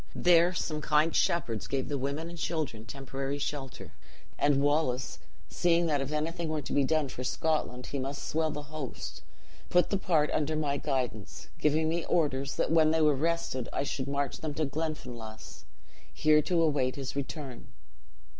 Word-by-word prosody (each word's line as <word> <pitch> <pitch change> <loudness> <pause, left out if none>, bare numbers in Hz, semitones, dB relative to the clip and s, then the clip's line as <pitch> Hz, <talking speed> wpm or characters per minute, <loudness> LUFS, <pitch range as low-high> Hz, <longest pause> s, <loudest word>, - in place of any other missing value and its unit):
There 175 0 +5
some 155 -4 -2
king 150 +2 +3
shepherds 120 -13 +1
gave 135 -1 -1
the 145 - -2
woman 140 +5 -2
and 170 - -8
children 155 -10 -3
temporary 135 +3 -4
shelter; 140 -2 -5 0.4
and 145 -1 +3
Wallace, 140 -3 +1 0.3
seeing 170 0 +2
that 150 -4 +1
if 135 +1 -3
anything 160 +2 -2
were 155 -2 -2
to - - -5
be 145 - +4
done 155 +1 +2
for 125 -1 -6
Scotland, 125 -2 -1
he 140 - -4
must 140 +2 -4
swell 160 0 +1
the 150 -1 -5
host, 145 -3 -6 0.5
put 180 0 +3
the 200 - +1
part 155 -6 +2
under 155 +1 0
my 145 -2 0
guidance, 125 -9 -3
giving 155 +1 +2
me 165 +1 0
orders 140 -5 +1
that - - 0
when 160 -1 +5
they 160 0 +2
were 150 -1 +5
rested 160 -4 -1
I - - -1
should 135 -1 -3
march 140 0 -1
them 155 -2 -4
to 155 - +1
Glenfinlass, 125 -7 -5 0.5
here 150 0 +4
to 170 +1 +2
await 140 -5 +1
his 135 -1 -5
return. 140 -2 -5
150 Hz, 175 wpm, -30 LUFS, 135-160 Hz, 0.5 s, There